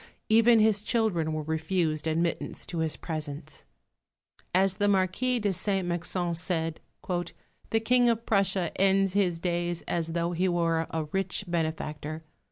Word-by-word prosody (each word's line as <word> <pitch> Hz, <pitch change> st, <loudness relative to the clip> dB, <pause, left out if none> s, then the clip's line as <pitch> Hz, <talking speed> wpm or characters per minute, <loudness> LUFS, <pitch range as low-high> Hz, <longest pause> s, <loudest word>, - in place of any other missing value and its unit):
Even 230 Hz, +1 st, +6 dB
his 215 Hz, -2 st, +3 dB
children 215 Hz, -8 st, 0 dB
were 155 Hz, 0 st, -2 dB
refused 160 Hz, 0 st, -1 dB
admittance 165 Hz, +2 st, -1 dB
to 170 Hz, -, -4 dB
his 160 Hz, -1 st, 0 dB
presence. 155 Hz, -2 st, -6 dB, 0.9 s
As 190 Hz, +1 st, +2 dB
the 205 Hz, -1 st, +2 dB
Marquis 200 Hz, +6 st, +2 dB
de 205 Hz, -4 st, 0 dB
Saint 190 Hz, 0 st, 0 dB
Mexent 175 Hz, 0 st, -1 dB
said, 165 Hz, -2 st, -1 dB, 0.9 s
"The 225 Hz, -, +2 dB
King 245 Hz, +2 st, +3 dB
of 230 Hz, 0 st, 0 dB
Prussia 195 Hz, -4 st, +1 dB
ends 195 Hz, -1 st, +3 dB
his 180 Hz, -4 st, +1 dB
days 175 Hz, -1 st, -2 dB
as 165 Hz, -1 st, -2 dB
though 170 Hz, 0 st, 0 dB
he 180 Hz, +2 st, +1 dB
were 165 Hz, -2 st, +1 dB
a 160 Hz, -1 st, -2 dB
rich 195 Hz, +1 st, -1 dB
benefactor. 155 Hz, -2 st, -3 dB
175 Hz, 145 wpm, -28 LUFS, 160-200 Hz, 0.9 s, Even